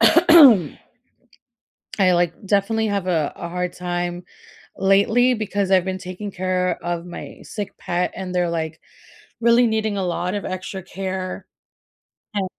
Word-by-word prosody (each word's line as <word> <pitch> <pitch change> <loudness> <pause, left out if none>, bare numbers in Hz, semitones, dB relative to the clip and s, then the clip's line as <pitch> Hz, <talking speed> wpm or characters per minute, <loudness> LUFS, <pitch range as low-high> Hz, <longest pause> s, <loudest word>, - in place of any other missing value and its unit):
I 280 - +6 1.4
like 175 -1 +2
definitely 205 +3 +1
have 200 -3 -2
a 160 -5 0
a 170 - -6
hard 180 0 -3
time 175 0 -3 0.5
lately 205 +6 +3
because 205 -3 -2
I've 185 -2 +4
been 190 0 -2
taking 185 +3 -7
care 185 -1 -1
of 175 0 -3
my 175 - -9
sick 205 -2 -7
pet, 180 +1 -2
and 185 -1 -6
they're, 175 -1 +1
like, 160 -1 -4 0.6
really 235 +1 +5
needing 220 -2 0
a 190 - -1
lot 180 +2 -2
of 205 - -4
extra 185 0 -5
care, 190 0 -5 0.9
and 200 -2 -1
185 Hz, 140 wpm, -21 LUFS, 180-205 Hz, 1.4 s, I